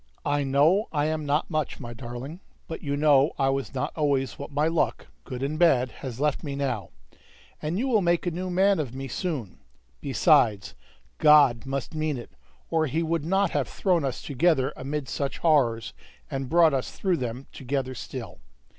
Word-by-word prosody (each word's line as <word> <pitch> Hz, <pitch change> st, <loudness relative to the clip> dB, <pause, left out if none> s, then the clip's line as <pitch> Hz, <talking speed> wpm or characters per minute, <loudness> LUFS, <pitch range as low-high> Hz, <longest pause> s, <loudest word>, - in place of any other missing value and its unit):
"I 145 Hz, 0 st, +1 dB
know 150 Hz, -, +3 dB
I 145 Hz, -2 st, 0 dB
am 155 Hz, -1 st, -2 dB
not 150 Hz, +4 st, 0 dB
much, 155 Hz, -2 st, -2 dB
my 120 Hz, -2 st, -7 dB
darling; 120 Hz, +7 st, -7 dB, 0.3 s
but 160 Hz, -, -6 dB
you 140 Hz, -1 st, -2 dB
know 145 Hz, 0 st, +4 dB
I 135 Hz, -1 st, +2 dB
was 135 Hz, -1 st, -2 dB
not 125 Hz, -, -2 dB
always 140 Hz, -4 st, 0 dB
what 140 Hz, -, -6 dB
my 150 Hz, +2 st, +1 dB
luck, 165 Hz, 0 st, 0 dB, 0.2 s
good 130 Hz, -1 st, -5 dB
and 150 Hz, +3 st, -2 dB
bad, 130 Hz, -8 st, +4 dB
has 130 Hz, -3 st, -8 dB
left 150 Hz, -1 st, 0 dB
me 140 Hz, -3 st, -4 dB
now, 130 Hz, -10 st, -2 dB, 0.7 s
and 155 Hz, +4 st, -2 dB
you 255 Hz, +6 st, 0 dB
will 225 Hz, -5 st, +3 dB
make 175 Hz, -1 st, +1 dB
a 175 Hz, -, 0 dB
new 180 Hz, +3 st, -4 dB
man 190 Hz, +1 st, +3 dB
of 130 Hz, -5 st, -4 dB
me 135 Hz, 0 st, -5 dB
so 125 Hz, -, -5 dB
soon! 140 Hz, -, -4 dB, 0.4 s
Besides, 120 Hz, -, +3 dB, 0.5 s
God 140 Hz, -6 st, +5 dB
must 135 Hz, +1 st, -3 dB
mean 155 Hz, -2 st, -1 dB
it, 120 Hz, -, -9 dB, 0.4 s
or 160 Hz, -1 st, +2 dB
He 160 Hz, +5 st, -1 dB
would 165 Hz, -1 st, -1 dB
not 195 Hz, +2 st, +2 dB
have 140 Hz, -4 st, 0 dB
thrown 180 Hz, -5 st, +1 dB
us 135 Hz, -2 st, -3 dB
together 145 Hz, -2 st, +1 dB
amid 140 Hz, +1 st, -4 dB
such 140 Hz, +1 st, -3 dB
horrors, 125 Hz, -9 st, +2 dB, 0.4 s
and 135 Hz, -1 st, -3 dB
brought 165 Hz, -2 st, +5 dB
us 130 Hz, -2 st, -1 dB
through 185 Hz, -3 st, -1 dB
them 125 Hz, +1 st, -4 dB
together 130 Hz, 0 st, -3 dB
still. 125 Hz, -, -7 dB
145 Hz, 190 wpm, -26 LUFS, 130-160 Hz, 0.7 s, God